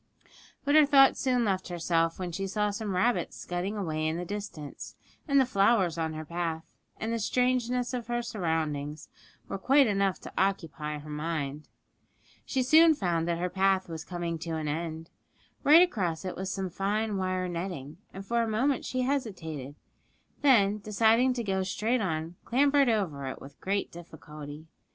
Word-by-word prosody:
But 285 - +2
her 305 -1 +7
thoughts 275 -2 +6
soon 250 -3 +1
left 190 -2 -1
herself 165 -1 0
when 180 -2 -4
she 195 +3 -3
saw 210 +1 0
some 205 -2 -3
rabbits 235 +7 +1
scudding 180 +4 -3
away 155 -5 -1
in 160 +1 -1
the 180 - -4
distance; 200 -7 -7 0.3
and 280 -1 +4
the 265 - +5
flowers 195 -6 +3
on 160 -1 -2
her 155 0 -6
path, 165 0 -3 0.4
and 225 +1 -2
the 230 - -1
strangeness 250 +1 0
of 240 -2 -4
her 240 0 -1
surroundings, 160 - -3 0.4
were 195 - -4
quite 275 +6 +5
enough 195 -3 +1
to - - -10
occupy 165 -6 -1
her 150 +1 -10
mind. 150 -1 -3 0.8
She 260 -2 0
soon 315 +4 +6
found 170 - 0
that 170 -1 0
her 180 +1 -1
path 190 0 +1
was 160 -2 -6
coming 170 -2 -4
to 165 0 -4
an 155 -1 -3
end; 160 +1 -4 0.5
right 315 +5 +8
across 190 - -1
it 185 - -4
was 190 +1 -4
some 190 -2 -3
fine 205 +3 -1
wire 185 -1 -1
netting, 170 -4 -5
and 195 +1 -8
for 235 +3 +1
a 230 - 0
moment 255 +5 +1
she 255 - -2
hesitated, 180 - -3 0.7
then, 215 -7 +4
deciding 225 +5 +3
to 240 -1 -3
go 190 -2 0
straight 220 +6 0
on, 165 -2 -3
clambered 280 +1 +3
over 165 -12 -1
it 130 - -5
with 135 - -13
great 200 +1 -1
difficulty. 155 -3 -10
190 Hz, 175 wpm, -29 LUFS, 165-230 Hz, 0.8 s, right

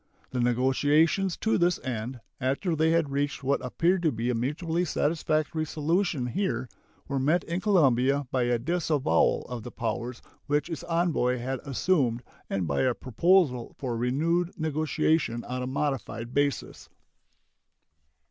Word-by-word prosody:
The 130 - -2
negotiations 145 - +2
to 220 - +1
this 175 0 +2
end, 120 0 -4 0.2
after 140 +7 0
they 160 +1 +2
had 165 -3 +2
reached 140 0 -1
what 140 0 0
appeared 170 +8 +1
to 160 -3 +2
be 115 +1 -1
a - - 0
mutually 160 +8 -1
satisfactory 155 -1 0
solution 160 -1 0
here, 185 - -1 0.4
were 140 -1 -1
met 155 +7 +2
in 170 +3 -3
Colombia 140 - +3
by 125 -2 +1
a 120 0 +2
disavowal 150 - +1
of 125 -1 -5
the 120 - -7
powers 120 +1 -4 0.2
which 145 +3 0
its 160 - -4
envoy 165 -7 +1
had 130 +2 -3
assumed 135 -4 0 0.3
and 95 -3 -1
by 70 -2 0
a 125 -2 +2
proposal 130 - +2
for 125 -4 -3
renewed 160 +9 +1
negotiation 155 -4 0
on 125 +1 -4
a 125 - -3
modified 130 -4 -3
basis. 145 0 -1
140 Hz, 145 wpm, -27 LUFS, 125-165 Hz, 0.4 s, Colombia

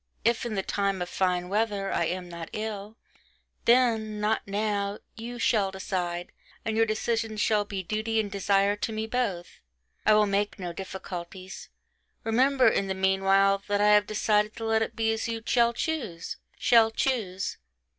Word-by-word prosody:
If 235 +1 +2
in 220 - -4
the 195 - -1
time 200 -1 -1
of 175 - -8
fine 180 -1 0
weather, 205 0 0
I - - +1
am 180 0 -3
not 170 -1 -7
ill,... 215 0 -5 0.7
then... 225 -3 +3
not 215 +1 +1
now... 200 0 -1 0.2
you 235 +2 -7
shall 210 -5 +2
decide, 180 -2 -3 0.3
and 220 - -1
your 225 0 +3
decision 225 0 -1
shall 210 0 +2
be 195 -2 -4
duty 220 +4 -1
and 205 -2 -2
desire 200 0 +2
to 225 - -2
me, 220 0 -2
both 220 -7 -2 0.4
I 215 - +5
will 210 0 +5
make 200 +1 0
no 180 -3 -5
difficulties. 185 0 -7 0.5
Remember, 255 +4 +3
in 195 - +2
the 190 - -2
meanwhile, 195 +1 +3
that 205 0 +1
I 210 0 +4
have 210 0 +5
decided 210 0 +1
to 225 - -5
let 220 0 +2
it 225 - -2
be 225 -1 +1
as 220 - -2
you 225 -1 -4
shall 235 -1 +3
choose... 235 - -3 0.2
shall 230 -2 +5
choose. 215 -5 -1
210 Hz, 170 wpm, -27 LUFS, 195-225 Hz, 0.7 s, I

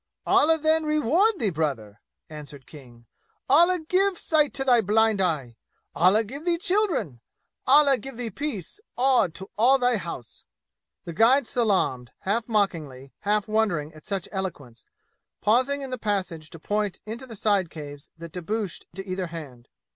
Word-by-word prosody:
"Allah, 320 +2 +4
then, 315 +1 +2
reward 305 - +2
thee, 215 - 0
brother!" 135 -10 -3 0.3
answered 150 -3 -10
King. 120 -5 -15 0.4
"Allah 345 +6 +5
give 380 +1 +2
sight 305 -3 +2
to 270 - -1
thy 245 -3 +4
blind 220 0 +2
eye! 140 -10 -1 0.4
Allah 190 +6 +4
give 270 +8 -9
thee 345 -1 +1
children! 355 - 0 0.5
Allah 280 -1 +6
give 270 -3 -9
thee 240 -2 -4
peace, 280 - -5 0.2
and 250 -10 +3
to 190 +3 -7
all 255 +4 +5
thy 245 -2 +2
house!" 170 - -8 0.6
The 170 - -6
guide 240 - +4
salaamed, 190 - 0
half 225 +5 -1
mockingly, 155 - -2
half 210 +1 0
wondering 205 -9 0
at 155 -1 -14
such 195 -3 -2
eloquence, 145 - -6 0.5
pausing 260 +6 +1
in 265 - -7
the 255 - -4
passage 185 -7 -3
to 165 - -11
point 205 +2 -2
into 235 +5 -7
the 230 - -9
side 200 -4 +1
caves 145 -3 -10
that 165 0 -9
debouched 190 +3 -4
to 195 0 -5
either 185 -1 -3
hand. 140 -8 -10
205 Hz, 155 wpm, -25 LUFS, 160-260 Hz, 0.6 s, Allah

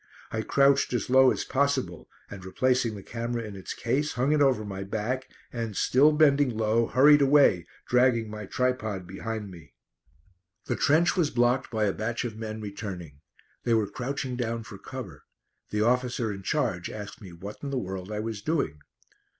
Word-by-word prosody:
I 110 - -1
crouched 140 +4 +3
as 120 0 -2
low 130 0 +7
as - - -1
possible 130 - -1 0.2
and 100 -2 -10
replacing 125 +3 +1
the 100 - -9
camera 115 +1 -4
in 105 -2 -8
its 95 - -7
case 135 +6 -1
hung 125 +4 +1
it 150 -1 +3
over 130 -6 +3
my 95 -1 -5
back 110 +6 -3 0.2
and, 115 -4 -4
still 140 +4 +4
bending 145 -2 +4
low, 110 +1 +2
hurried 145 +3 +6
away 135 - +4 0.2
dragging 125 -2 +3
my 105 -1 -7
tripod 110 -7 -1
behind 105 +2 -5
me. 80 -8 -14 0.9
The - - -1
trench 160 +6 +3
was 170 -6 +2
blocked 125 0 +1
by 110 -2 -1
a 100 -2 +1
batch 115 +3 -3
of 115 -3 -5
men 110 0 -6
returning. 95 -8 -7 0.4
They 115 - +2
were 110 -2 +2
crouching 130 0 -3
down 115 -2 -2
for 100 -3 -11
cover. 115 - -9 0.4
The 105 - -1
officer 120 -2 0
in 95 - -8
charge - - -1
asked 105 0 -8
me 95 -4 -10
what 95 +5 -9
in 140 - -4
the 135 - -2
world 95 -2 -5
I 105 0 -2
was 110 -2 -4
doing. 140 - -1
115 Hz, 180 wpm, -27 LUFS, 100-130 Hz, 0.9 s, low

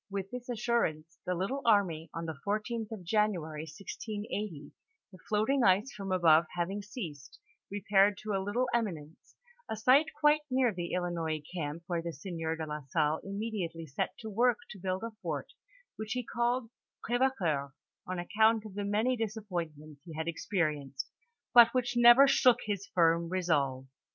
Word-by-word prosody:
"Witii 195 -1 -4
this 250 0 -7
assurance 220 -10 -1
the 180 - 0
little 200 +11 -2
army, 190 -8 +2
on 165 0 -5
the 160 - -3
14th 215 +2 -2
of 215 -5 -6
January, 170 -6 0
1680, 205 -2 -6 0.4
the 185 - -14
floating 220 +6 +2
ice 200 +6 +4
from 195 -2 -6
above 165 -3 +5
having 185 +4 -2
ceased, 180 - -8 0.3
repaired 200 0 +3
to 215 +1 -5
a 195 - 0
little 235 +6 0
eminence, 165 -10 -3 0.3
a - - -2
site 255 +8 +5
quite 300 0 +5
near 255 -3 +2
the 175 -2 -4
Ilinois 165 -4 -2
camp 160 -1 -4
where 175 -1 -1
the 170 0 -5
Sieur 165 +1 -4
de 160 -1 -4
la 150 0 -5
Salle 150 +3 +1
immediately 195 -5 -4
set 140 -3 -3
to 220 - -8
work 235 +2 +2
to 195 - -10
build 185 +2 -2
a 230 - -4
fort, - - -4 0.4
which 220 0 -4
he 250 0 -2
called 240 0 -1 0.4
Cr^vecoeur, 190 - 0 0.3
on 185 0 -3
account 220 +5 +2
of 210 - -9
the 205 +1 -3
many 215 +5 +1
disap 220 -2 -4
pointments 155 -4 -5
he 165 -3 -10
had 160 +1 -3
experienced, 155 -6 -2 0.4
but 235 -1 +9
which 245 -1 +1
never 240 +3 +8
shook 250 -3 +5
his 200 -2 -3
firm 170 -1 +2
resolve. 145 -8 0
195 Hz, 165 wpm, -31 LUFS, 165-225 Hz, 0.4 s, but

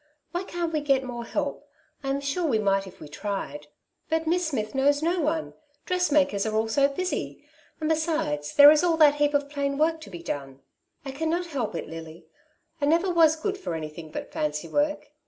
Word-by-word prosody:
Why 350 +1 -2
can^t 345 -2 -3
we 305 - +1
get 275 -2 +2
more 240 -2 -6
help? - - -3 0.3
I 270 - -2
am 275 +1 0
sure 300 +5 -1
we 240 -7 +2
might 195 -2 +1
if 185 - -13
we 155 - -9
tried/' 150 -4 -5 0.4
^'But 320 0 +1
Miss 350 +1 +1
Smith 215 -8 -3
knows 285 +2 +2
no 345 +2 +1
one 315 +1 -1 0.2
— 290 0 -41
dressmakers 295 - +2
are 215 - -2
all 220 +1 +1
so 275 +5 +3
busy; 365 +7 -4 0.3
and 310 - -2
besides 310 - -1
there 285 +1 +10
is 310 +1 +4
all 335 -2 +2
that 300 -2 +7
heap 295 0 +2
of 285 0 +1
plain 280 -1 -2
work 320 +1 +1
to - - -10
be 175 -3 -9
done/' 135 -3 -5 0.2
'* - - -42
I 270 - -4
cannot 320 +5 -1
help 270 - -3
it, - - -4
Lily; 160 +1 -9 0.6
I 285 - +2
never 340 +5 +3
was 320 -2 +5
good 390 +5 -3
for 360 - -4
anything 155 0 -7
but - - -7
fancy 150 +1 -2
work. 295 - -1
285 Hz, 210 wpm, -26 LUFS, 200-320 Hz, 0.6 s, there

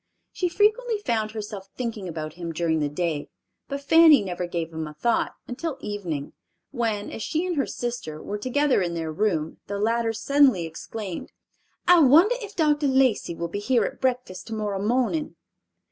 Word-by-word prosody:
She 360 - -1
frequently 435 +5 +2
found 230 - -1
herself 210 -3 -7
thinking 225 -6 -4
about 155 -2 -5
him 170 -1 -5
during 160 -1 0
the 150 -1 0
day, 155 -1 -2 0.4
but 280 0 -4
Fanny 315 -4 +7
never 180 -2 -3
gave 165 -1 -4
him 160 -1 -4
a 150 - -10
thought 235 +9 0
until 275 +3 -4
evening, 180 - -4 0.4
when, 225 -5 -2
as - - -6
she 320 - -1
and 360 -2 -1
her 275 - 0
sister 240 -11 -4
were 205 +5 -5
together 265 +1 +2
in 175 -2 -1
their 160 -1 -3
room, 160 -3 -1
the 200 - -3
latter 230 +2 +1
suddenly 235 -4 +3
exclaimed, 180 +3 -6 0.6
"I 355 -1 +8
wonder 325 - +6
if 420 -1 -8
Dr. 300 -3 +2
Lacey 260 -10 +2
will 170 +1 -3
be 185 +4 -4
here 235 +2 +2
at - - -6
breakfast 250 -8 -2
tomorrow 210 -3 -3
morning." 255 +7 0
220 Hz, 175 wpm, -25 LUFS, 175-280 Hz, 0.6 s, I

